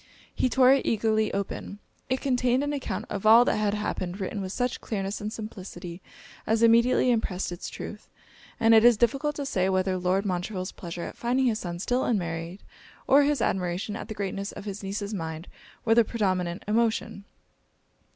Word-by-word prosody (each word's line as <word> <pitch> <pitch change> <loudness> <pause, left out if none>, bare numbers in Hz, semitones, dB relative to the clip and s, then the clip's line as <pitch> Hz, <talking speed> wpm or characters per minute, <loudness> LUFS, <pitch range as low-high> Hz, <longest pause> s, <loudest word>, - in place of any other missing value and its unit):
He 255 - +1
tore 255 +1 +6
it 275 - +2
eagerly 220 -1 +1
open 200 0 -4 0.3
it 260 +1 0
contained 255 0 +1
an 290 0 -1
account 280 - -3
of 200 -2 -3
all 230 +3 +8
that - - +2
had 210 -1 +1
happened, 190 -3 -3
written 200 +1 -3
with 190 -1 -4
such 250 +3 -2
clearness 200 -2 -3
and 210 +1 -4
simplicity 185 -5 -8 0.5
as 225 +1 +2
immediately 235 +2 +5
impressed 195 -6 -1
it's 175 - -6
truth; - - -8 0.5
and 225 -1 +5
it 220 0 +7
is 240 -2 +7
difficult 275 +6 +1
to 285 - -4
say 190 -7 0
whether 185 0 +1
Lord 185 +3 +1
Montreville's 185 0 -3
pleasure 170 -1 -7
at - - -7
finding 250 +2 +1
his 225 -3 +1
son 175 -1 -5
still 245 +8 0
unmarried, 170 -3 -2 0.4
or 280 +2 +6
his 285 -3 +1
admiration 185 +3 -1
at - - -6
the 220 - -6
greatness 200 0 -3
of - - -9
his 200 -1 -5
niece's 200 +1 -4
mind, 160 -2 -5 0.4
were 225 - +4
the 235 0 +6
predominant 185 -5 -1
emotion. 220 -2 0
210 Hz, 180 wpm, -27 LUFS, 185-235 Hz, 0.5 s, all